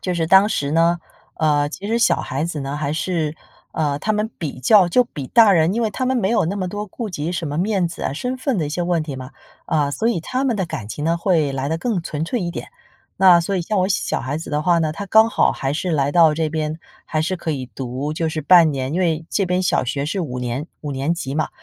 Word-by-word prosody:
就 180 -1 -2
是 165 -1 0
当 190 +4 +6
时 145 -8 -1
呢 165 +2 +3 0.4
呃， 145 -2 +1
其 190 +6 -7
实 230 +2 +1
小 235 - +3
孩 135 +4 -3
子 165 -3 -4
呢， 135 +1 -4
还 150 -1 -2
是 155 -1 -2 0.4
呃， 145 -3 -1
他 215 +7 -1
们 210 +1 -1
比 150 -6 -5
较 185 - +5
就 250 +8 +4
比 145 - -7
大 225 - +6
人 170 +1 +3
因 235 - 0
为 220 - 0
他 255 +4 -2
们 260 - +1
没 215 -5 +1
有 230 -8 +2
那 195 +5 -2
么 185 - -2
多 205 +3 -5
顾 215 +2 -6
及 160 -1 -3
什 170 -2 -3
么 145 +1 -3
面 190 -1 +1
子 170 - -7
啊、 - - -1
身 250 - -3
份 260 -2 -1
的 160 - 0
一 - - -4
些 160 +4 -2
问 175 -2 0
题 150 -3 -6
嘛， 130 0 -8 0.4
啊， 150 -3 +1
所 220 +10 0
以 235 - 0
他 255 +11 -2
们 245 -5 +1
的 190 - 0
感 155 -11 -6
情 145 +6 -5
呢， 165 +1 +2
会 165 -6 +1
来 135 +1 -2
得 160 - 0
更 220 -3 -1
纯 155 -2 -3
粹 235 +8 -2
一 175 -2 -2
点。 - - -7 0.5
那 185 -2 +7
所 185 +4 -2
以 185 - 0
像 200 +4 -1
我 185 - +2
小 195 - -1
孩 135 +5 -3
子 165 - -8
的 150 +1 0
话 170 0 +3
呢， 155 -2 0
他 200 - -6
刚 220 +3 +5
好 - - +2
还 135 0 -2
是 175 +4 -2
来 140 -3 +1
到 165 0 +5
这 160 0 0
边， 155 0 -3 0.3
还 155 - -2
是 180 +4 -1
可 170 -2 -4
以 135 -4 -3
读 135 +3 -4
就 165 0 -1
是 155 - -3
半 165 +1 +6
年， 135 +1 -3
因 180 - 0
为 165 -3 0
这 200 - 0
边 180 0 0
小 180 - +1
学 140 +3 -2
是 185 +4 -2
5 125 -7 -4
年 125 +4 -3
5 150 - -5
年 140 +4 -1
级 140 -5 -4
嘛， 155 - 0
165 Hz, 290 characters per minute, -20 LUFS, 150-190 Hz, 0.5 s, 那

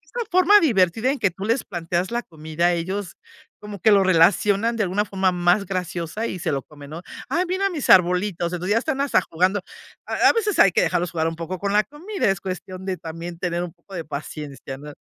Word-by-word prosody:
una 480 -1 -2
forma 370 +3 +6
divertida 225 - +2
en 280 - -4
que 200 - +2
tú 190 +3 -7
les 230 +4 +1
planteas 175 +2 -3
la 240 - -1
comida 160 +1 -1
ellos 185 +3 -4 0.5
como 210 -1 -8
que 215 - +4
lo 200 -1 +5
relacionan 200 +5 +3
de 225 - 0
alguna 200 +3 0
forma 190 -2 0
más 180 +3 +2
graciosa 180 +3 -3
y 185 - -5
se 165 - -2
lo 135 -2 -2
comen, 145 -2 -13
¿no? 165 +2 -7 0.3
"¡Ay 355 +2 +1
mira 380 +2 0
mis 320 -7 -4
arbolitos!" 180 -1 +3
Entonces 180 +3 -1
ya 225 - +3
están 275 +1 -3
hasta 280 -8 +2
jugando. 185 +4 0 0.5
A - - -3
a - - +4
veces 430 -3 0
hay 195 - +7
que - - +3
dejarlos 175 -1 0
jugar 160 -1 0
un 165 - -7
poco 175 +2 -5
con 200 +1 -2
la 210 +1 +4
comida 355 - -2
es 195 -2 -1
cuestión 185 0 -6
de 190 -1 -2
también 165 +1 -8
tener 175 0 -2
un 175 - -6
poco 175 +3 -18
de 170 - -4
paciencia, 145 -2 -7
¿no? 150 +2 -10
185 Hz, 225 wpm, -22 LUFS, 170-210 Hz, 0.5 s, hay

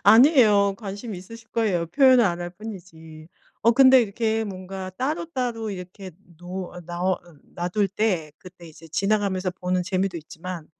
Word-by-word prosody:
아니에요. 215 -4 +6
관심 205 +2 -6
있으실 225 +5 -11
거예요. 195 -8 0
표현을 260 - +5
안 175 -2 0
할 175 - -4
뿐이지. 170 -6 -11 0.3
어 230 - +5
근데 260 +1 +7
이렇게 225 0 -1
뭔가 190 -1 -6
따로따로 255 -6 -2
이렇게 185 +1 -8 0.3
노 180 +1 -6
어 180 - -9
나으 175 +2 -1 0.4
놔둘 180 +4 0
때 185 -7 -1
그때 180 -2 -14
이제 165 +1 -14
지나가면서 195 +1 0
보는 180 0 -2
재미도 185 0 -1
있지만 165 +1 -8
195 Hz, 330 characters per minute, -24 LUFS, 180-225 Hz, 0.4 s, 근데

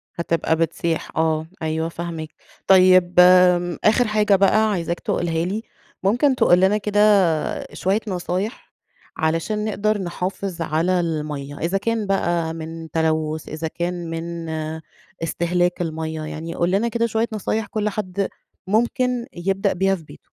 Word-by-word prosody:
هتبقى 165 -1 0
بتسيح 165 0 -1
آه، 160 -1 +1
أيوه 160 +1 -1
فاهماك. 165 -2 -6 0.4
طيب 185 -1 +6
آمم، 180 -1 +5
آخر 225 +3 +4
حاجة 210 -1 +3
بقى 215 +3 +3
عايزاك 170 -3 -2
تقولها 165 -1 -1
لي، 205 +5 -3 0.4
ممكن 245 +8 +3
تقول 175 -7 +4
لنا 190 +3 +4
كده 210 0 -1 0.7
شوية 195 +3 0
نصايح 185 +3 -3 0.5
علشان 165 +7 -1
نقدر 215 0 0
نحافظ 180 0 -4
على 165 +3 +1
المَيَّة، 150 -4 -3
إذا 175 +4 0
كان 220 +1 -1
بقى 175 -4 0
من 165 0 -7
تلوث 160 -1 -1
إذا 155 +1 -4
كان 175 +1 -4
من 165 0 -5 0.7
استهلاك 175 +2 0
المَيَّة، 160 -1 -3
يعني 165 +2 -6
قُل 175 +1 +1
لنا 200 +5 +2
كده 235 0 0
شوية 225 0 0
نصايح 215 +1 -1
كل 210 0 -1
حد 200 -1 -3 0.4
ممكن 240 +3 +1
يبدأ 195 +3 0
بيها 195 +1 +1
في 170 - -11
بيته. - - -14
180 Hz, 140 wpm, -22 LUFS, 165-205 Hz, 0.7 s, طيب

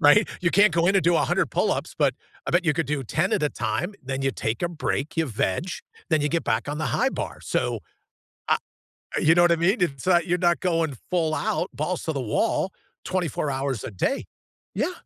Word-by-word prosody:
right? 155 +8 +6
You 170 - +3
can't 200 +2 +5
go 170 +1 +2
in 195 - +3
and 195 - +4
do 170 0 +4
100 160 - +1
pull-ups, - - 0
but - - +3 0.3
I - - -1
bet 175 +1 +3
you 160 - +3
could 165 -3 0
do 145 0 -1
10 155 - 0
at - - +1
a 150 - +3
time, 120 - -2
then 135 0 -3
you 135 - +2
take 115 -2 -3
a 175 - +1
break, 155 -3 -3
you 165 - +2
veg, 125 - -1 0.4
then 155 -2 +3
you 150 - +1
get 170 +1 -1
back 110 +4 0
on 145 - -2
the 155 - -1
high 125 - +2
bar. - - -5
So, - - -1 0.7
ah - - +4 0.6
you 160 +2 +5
know 175 - +5
what 175 - +5
I 170 - +4
mean? 190 +8 +2
It's 140 -3 -1
not, 175 -2 +4
you're 180 0 +1
not 175 -1 +2
going 165 -6 0
full 165 -3 +1
out, 145 - -1
balls 160 +5 -2
to 160 - -1
the 140 - -2
wall, 185 - 0 0.3
24 170 -5 -1
hours 135 -4 -2
a - - -4
day. 95 - -1 0.5
Yeah. - - 0
160 Hz, 225 wpm, -25 LUFS, 135-175 Hz, 0.7 s, right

